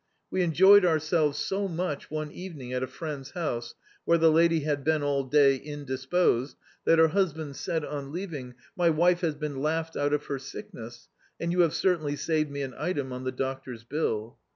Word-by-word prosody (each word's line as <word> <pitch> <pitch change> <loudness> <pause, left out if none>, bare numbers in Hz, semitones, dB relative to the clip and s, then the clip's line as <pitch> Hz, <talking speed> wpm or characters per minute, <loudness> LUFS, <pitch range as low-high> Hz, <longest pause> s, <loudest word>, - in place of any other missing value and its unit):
We 185 - +1
enjoyed 190 +4 +6
ourselves 155 -3 +2
so 195 +6 -1
much 170 -4 -3
one 155 -1 -4
evening 155 -10 -8
at 125 - -1
a 130 - -1
friend's 145 0 -6
house, 120 -9 -3 0.3
where 170 - +4
the 165 -1 +5
lady 165 0 +4
had 145 -1 -1
been 155 0 +1
all 140 -1 +1
day 140 0 +5
in 145 +1 -8
disposed, 130 0 0 0.3
that 165 - +5
her 160 0 +6
husband 160 -5 -1
said, 160 +2 -2
on 140 -2 -5
leaving, 150 -8 -6 0.2
"My 175 -3 +3
wife 175 +3 +3
has 160 -4 0
been 145 -2 -4
laughed 160 +2 -1
out 145 0 0
of 150 0 0
her 140 - -3
sickness, 120 - -9 0.3
and 170 - -1
you 180 - -1
have 170 -3 +4
certainly 155 -6 +1
saved 155 0 0
me 140 0 -4
an 130 -2 -5
item 140 -8 -2
on 125 +1 -6
the 130 - -1
doctor's 130 -2 -5
bill." 115 -5 -2
150 Hz, 195 wpm, -28 LUFS, 135-170 Hz, 0.3 s, enjoyed